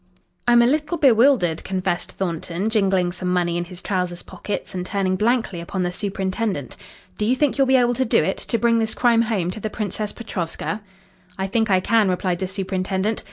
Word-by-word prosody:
"I'm 240 0 +6
a - - +4
little 300 +6 +1
bewildered," 235 - +4
confessed 185 -2 -2
Thornton, 180 +3 -2
jingling 190 -4 +2
some 180 0 -3
money 175 -1 +1
in 175 0 -1
his 180 0 -10
trousers 180 -3 -2
pockets 205 - -5
and 180 -1 -3
turning 185 0 0
blankly 220 -4 0
upon 180 +2 -3
the 175 - -1
superintendent. 190 - -3 0.4
"Do - - 0
you 250 - +3
think 285 0 +1
you'll 270 - +4
be 265 - +4
able 245 -1 +4
to 260 - 0
do 225 - +3
it 190 - -1
to 230 - -1
bring 230 0 +3
this 220 -1 -1
crime 235 -2 +4
home 205 -6 0
to 200 - -6
the 215 - -3
Princess 210 0 -3
Petrovska?" 210 -1 -4 0.6
"I 190 - -1
think 220 +3 0
I 185 -1 +4
can," 220 -1 +3
replied 180 -1 -1
the 190 - -2
superintendent. 190 +2 -2
195 Hz, 200 wpm, -22 LUFS, 180-230 Hz, 0.6 s, I'm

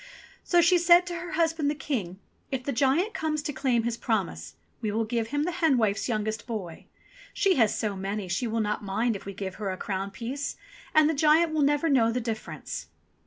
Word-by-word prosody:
So 350 -1 +4
she 345 +1 +5
said 345 +1 +6
to 350 - -5
her 340 +1 -6
husband 325 -3 +1
the 300 - -1
King, 210 - -3 0.3
"If 265 -2 -3
the 280 - -2
giant 280 - +2
comes 305 -5 -2
to 295 - -3
claim 255 -4 +1
his 235 0 -2
promise, 170 - -2 0.3
we 215 - -1
will 225 +2 0
give 230 0 -1
him 290 +4 -1
the 355 - -1
hen 320 -6 +2
wife's 215 0 +1
youngest 220 0 -2
boy. 195 -8 -6 0.5
She 390 -3 +3
has 225 -4 +3
so 210 -2 -1
many 195 +1 -3
she 185 +8 -1
will 225 0 0
not 210 0 -2
mind 220 +4 0
if 195 - -8
we 200 - -5
give 190 -2 -4
her 200 - -1
a 185 - -3
crown 195 0 -3
piece, 250 +8 -4 0.4
and 310 -1 +6
the 320 - +2
giant 315 +2 +4
will 310 - +1
never 290 +3 +2
know 240 -6 +4
the 250 - -1
difference." 225 -2 -5
240 Hz, 215 wpm, -27 LUFS, 210-305 Hz, 0.5 s, said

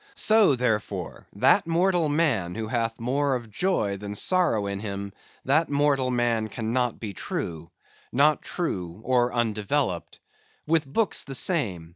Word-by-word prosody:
So, 215 -9 +4
therefore, 105 -7 -2
that - - +4
mortal 170 -1 +2
man 145 - +1
who 110 0 -3
hath 115 -1 -2
more 135 +3 0
of 115 -3 -6
joy 105 - 0
than 105 +1 -6
sorrow 170 - +1
in 100 0 -3
him, 100 -1 -5 0.3
that 155 +5 +2
mortal 140 -2 +2
man 120 -3 +1
cannot 120 +3 -2
be 105 -3 -5
true—not 85 - -2
true, 90 - -4
or 125 -1 +2
undeveloped. 110 -2 -1 0.5
With 160 -2 +1
books 220 +5 +1
the 135 0 -5
same. 105 - -1
120 Hz, 135 wpm, -26 LUFS, 105-145 Hz, 0.5 s, So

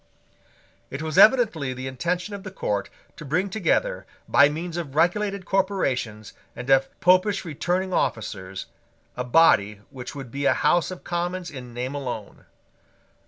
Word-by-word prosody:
It 140 +3 -5
was 155 -1 0
evidently 215 - +5
the 130 +1 -6
intention 175 +9 -2
of 200 - -6
the 190 - -7
court 105 - -2 0.3
to - - -8
bring 180 +7 -1
together, 360 - 0 0.2
by 140 +1 +6
means 165 +3 -5
of 155 -6 -5
regulated 195 +4 +1
corporations 135 - -1 0.2
and 125 +2 -7
of 135 0 +2
Popish 185 +2 +3
returning 180 +4 -2
officers, 95 - -2 0.5
a 125 - -2
body 105 -7 +4
which 125 0 -8
would 135 -4 -8
be 140 +2 -3
a - - +4
House 175 -1 +2
of 185 -1 -8
Commons 175 +1 -3
in 125 -4 -9
name 125 +3 -3
alone. 125 -7 -6
160 Hz, 150 wpm, -24 LUFS, 130-185 Hz, 0.5 s, by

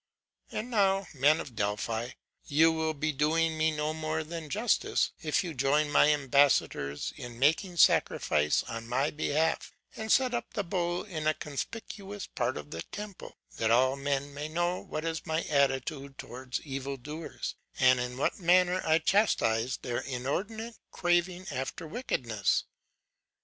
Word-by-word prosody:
'And 235 +4 -4
now, 195 -3 +3
men 145 +3 +4
of 125 - -7
Delphi, 110 +3 -2 0.3
you 160 +3 +5
will 160 -1 -1
be 155 +2 0
doing 160 +3 +1
me 155 0 +2
no 155 0 -1
more 160 0 -2
than 160 -1 -7
justice, 220 +6 +1
if 155 +2 +1
you 170 -3 -4
join 145 +2 +2
my 145 - +6
ambassadors 140 - +2
in 120 -4 -8
making 160 - +2
sacrifice 75 - +3
on 115 0 -6
my 130 +5 +1
behalf, 155 +1 0 0.2
and 220 0 -3
set 255 -2 +4
up 240 - -4
the 205 - 0
bull 175 -1 -1
in 160 -7 -4
a 155 - +3
conspicuous 200 +6 -6
part 120 -4 -2
of 75 0 -8
the 80 - -4
temple; 205 - -8 0.2
that 110 - +1
all 130 +3 +4
men 140 0 -2
may 145 +2 -4
know 175 +2 0
what 155 - -5
is 165 +1 -3
my 160 +1 0
attitude 140 0 0
towards 130 +1 -5
evil 135 -1 -4
doers, 150 +5 -6 0.2
and 130 0 +5
in 125 0 -3
what 140 - 0
manner 180 +1 +4
I 160 0 +4
chastise 130 - +2
their 120 -2 -3
inordinate 195 - -4
craving 175 +1 +1
after 135 +6 -4
wickedness. 120 - 0
155 Hz, 155 wpm, -30 LUFS, 130-175 Hz, 0.3 s, my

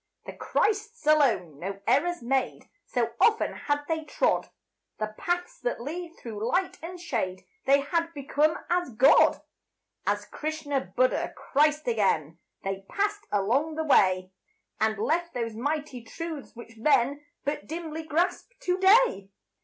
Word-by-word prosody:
The - - -7
Christs 435 0 -1
alone 230 - +3
no 195 +3 -5
errors 310 +6 +2
made; 260 +2 -1 0.2
So 235 -2 0
often 445 -1 +4
had 290 0 -1
they 320 -1 -1
trod 405 +11 0 0.5
The 215 0 -3
paths 355 - -2
that - - -2
lead 330 +6 -6
through 220 -3 -7
light 370 +6 0
and 355 +2 -7
shade, 220 - -3 0.2
They 275 +1 +5
had 335 +4 -1
become 295 +3 +1
as 350 -2 0
God. 265 +6 +5 0.6
As 205 +1 0
Krishna, 295 +3 -3
Buddha, - - +1
Christ 300 +1 +2
again, 175 -8 +1 0.2
They 195 0 -3
passed 415 +1 -1
along 250 +11 +1
the 320 - -1
way, 185 -10 +3 0.5
And 220 0 +1
left 335 +9 0
those 230 -2 -2
mighty 285 +1 -3
truths 315 +4 -7
which 230 -1 -12
men 275 +3 +2 0.2
But 290 +1 -2
dimly 320 0 -5
grasp 345 +9 -1
to 360 +1 0
day. 385 - +5
290 Hz, 140 wpm, -27 LUFS, 230-340 Hz, 0.6 s, They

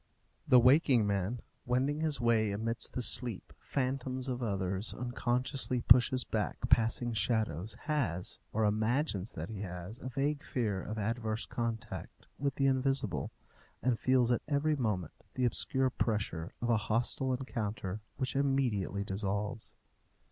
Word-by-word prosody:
The 125 - +8
waking 125 -2 +5
man, 100 +3 -1 0.2
wending 130 +4 +1
his 155 -4 +1
way 115 -3 +3
amidst 110 +3 -2
the 125 - -1
sleep 120 -2 +1
phantoms 130 -1 -2
of 125 0 -3
others, 95 -2 -1
unconsciously 125 +1 0
pushes 125 +1 +6
back 110 -2 -2
passing 115 +1 +3
shadows, 105 -3 0
has, 130 - -1
or 110 0 +1
imagines 110 - 0
that 80 +3 -5
he 100 -3 -5
has, 90 +4 -6
a 130 - -5
vague 145 +3 -1
fear 105 -7 -1
of 110 - -5
adverse 110 +1 -2
contact 115 -1 -5
with 140 -1 0
the 135 - +1
invisible, 130 - +1 0.5
and 125 -3 +2
feels 130 -2 +3
at 120 - +2
every 150 +1 +2
moment 105 - -1 0.2
the 130 - +1
obscure 130 +2 +1
pressure 100 -8 -1
of 120 - +2
a 115 - +4
hostile 120 +5 0
encounter 105 -6 -4 0.2
which 130 -1 -2
immediately 130 -8 +1
dissolves. 100 +2 -2
120 Hz, 140 wpm, -32 LUFS, 105-130 Hz, 0.5 s, The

